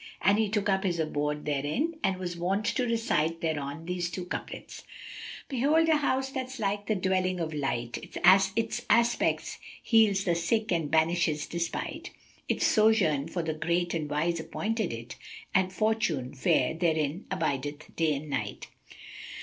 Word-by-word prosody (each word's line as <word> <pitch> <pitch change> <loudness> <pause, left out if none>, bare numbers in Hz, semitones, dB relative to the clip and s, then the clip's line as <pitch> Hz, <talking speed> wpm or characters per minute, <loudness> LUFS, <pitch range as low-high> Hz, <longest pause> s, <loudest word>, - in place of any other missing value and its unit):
And 200 +2 +4
he 220 -2 +2
took 210 -1 0
up 190 0 +2
his 180 -3 0
abode 150 -2 -1
therein 150 - 0
and 190 -1 +1
was 180 -1 -4
wont 190 +5 -1
to 235 +2 0
recite 195 -9 0
thereon 155 -1 -3
these 175 0 -2
two 175 +1 -5
couplets, 180 - -6 0.7
"Behold 300 +5 +2
a 315 - +5
house 265 -2 0
that's 260 0 -4
like 205 -1 -2
the 215 - +1
Dwelling 185 -1 0
of 160 -2 -2
Delight; 135 -5 -2
[FN#260] 190 +1 +5
* - - -25
Its 230 +1 -1
aspect 235 +2 +2 0.2
heals 215 -4 +4
the 175 - +2
sick 215 +6 0
and 165 -4 0
banishes 160 -1 +2
despite. 170 -1 -4 0.4
Its - - +1
sojourn 205 - +3
for 170 0 -3
the 160 -1 -1
great 170 +2 0
and 155 -3 -2
wise 165 +3 0
appointed 215 +4 -2
it, 115 +1 -7 0.2
* - - -16
And 185 0 +2
Fortune 215 - 0
fair 130 -1 +2
therein 160 0 0
abideth 145 -4 -3
day 160 -2 +2
and 145 +3 -6
night." 140 -3 -4
175 Hz, 165 wpm, -29 LUFS, 155-215 Hz, 0.7 s, a